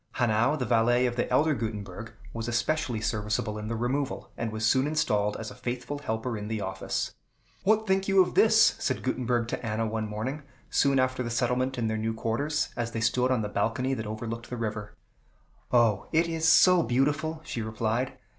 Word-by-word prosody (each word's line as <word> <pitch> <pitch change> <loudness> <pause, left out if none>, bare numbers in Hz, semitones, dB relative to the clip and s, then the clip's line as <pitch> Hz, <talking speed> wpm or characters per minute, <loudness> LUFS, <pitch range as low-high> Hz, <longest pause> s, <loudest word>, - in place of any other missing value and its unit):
Hanau, 120 +3 +2
the 130 - -2
valet 120 +1 +3
of 120 -1 -1
the 120 - -1
elder 150 +5 +3
Gutenberg, 110 -2 -5 0.2
was 115 0 -4
especially 120 0 0
serviceable 105 0 -1
in 105 - -5
the 115 - -2
removal, 130 +4 -2
and 115 -1 -3
was 110 0 -2
soon 130 +5 +3
installed 105 -9 +1
as 110 -1 -6
a - - -8
faithful 125 +3 -4
helper 110 -2 -3
in 105 -1 -5
the 110 0 -2
office. 95 -1 -3 0.5
"What 220 +2 +3
think 190 -1 +1
you 195 -1 +4
of 180 -1 +4
this?" 220 0 +5
said 130 - -1
Gutenberg 125 -2 0
to - - -4
Anna 110 0 -1
one 110 0 -2
morning, 120 +8 -4 0.3
soon 140 -1 +3
after 130 0 +1
the 120 - -3
settlement 125 +2 0
in 120 - -1
their 110 0 -1
new 110 +1 -2
quarters, 140 +8 -1
as 115 -1 -3
they 115 - -2
stood 125 +3 +2
on 125 -4 +1
the - - -2
balcony 115 +6 -1
that 110 -4 -4
overlooked 115 +2 -5
the 125 - -4
river. 105 -2 -4 0.8
"O, 115 -5 +3
it 165 +2 +3
is 160 -1 0
so 180 +2 +6
beautiful!" 150 +4 0
she 120 - -4
replied. 115 +4 -2
120 Hz, 195 wpm, -28 LUFS, 110-135 Hz, 0.8 s, so